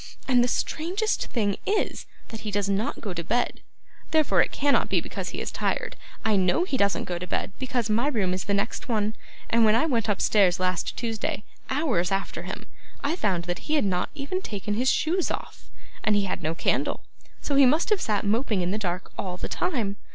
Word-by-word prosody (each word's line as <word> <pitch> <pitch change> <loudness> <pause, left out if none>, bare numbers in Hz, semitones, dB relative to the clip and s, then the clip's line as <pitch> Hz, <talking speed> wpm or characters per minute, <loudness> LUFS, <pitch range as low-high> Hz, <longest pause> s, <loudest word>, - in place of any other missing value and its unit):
And 250 -2 +5
the - - +2
strangest 365 - 0
thing 205 -5 0
is, 415 +1 -1 0.2
that 225 - -6
he 215 - -5
does 205 -1 0
not 200 +3 -1
go 200 -4 -3
to 170 -1 -4
bed; 240 +8 0 0.5
therefore 295 - +4
it - - +1
cannot 285 0 +2
be - - +3
because - - -5
he - - -5
is - - -3
tired. - - -1 0.3
I 220 -1 +4
know 185 - +3
he 360 - -1
doesn't 200 -5 +2
go 175 -1 -3
to 180 - -6
bed, - - -1
because 255 -3 -1
my 230 +5 +2
room 205 -10 +1
is 185 - -3
the 200 - +1
next 200 +5 -2
one, 215 -1 +1 0.3
and 230 0 +4
when 215 0 +5
I 235 - +3
went 230 -8 0
upstairs 200 -2 +3
last 185 -1 -1
Tuesday, 225 -3 -2 0.3
hours 265 - +1
after 195 0 -1
him, - - -6 0.4
I 300 +4 +1
found 190 - 0
that 175 - -5
he 310 - +3
had 290 - +2
not 180 -2 0
even 310 +6 -2
taken 210 - -3
his 250 +5 +2
shoes 345 +5 +2
off; - - -6 0.3
and 215 - +3
he 205 - +3
had 190 - -3
no 160 +2 -1
candle, - - 0 0.4
so 290 - -3
he 275 -1 +7
must 310 - +2
have 420 - +3
sat 210 -1 0
moping 215 -2 +1
in 175 - 0
the 210 - -1
dark 180 -2 -3
all 180 -2 -3
the - - -4
time. 235 - -1
215 Hz, 215 wpm, -26 LUFS, 195-270 Hz, 0.5 s, he